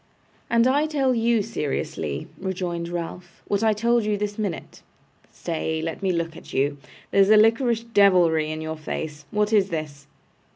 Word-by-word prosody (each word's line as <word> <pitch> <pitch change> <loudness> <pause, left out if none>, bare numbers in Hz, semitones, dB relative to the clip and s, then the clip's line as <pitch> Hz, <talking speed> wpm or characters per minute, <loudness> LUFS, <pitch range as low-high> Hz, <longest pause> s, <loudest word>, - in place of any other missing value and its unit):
'And 235 0 +4
I 285 +4 +3
tell 275 -4 +1
you 230 -2 +2
seriously,' 135 - -3
rejoined 180 -3 -3
Ralph, 175 +1 -7
'what 200 - 0
I 220 - +4
told 235 +2 +2
you 210 0 0
this 205 +1 -4
minute. 200 -6 -4 0.5
Stay. 160 -1 -3
Let 165 +3 -4
me 190 -1 +1
look 170 -1 -2
at - - -12
you. 145 +1 0 0.3
There's 195 0 +4
a 215 - +7
liquorish 230 +1 +3
devilry 180 -8 +4
in 155 0 -4
your 160 0 -4
face. 150 -1 -5
What 210 0 0
is 200 -2 +4
this? 150 -4 -5
190 Hz, 165 wpm, -24 LUFS, 160-220 Hz, 0.5 s, a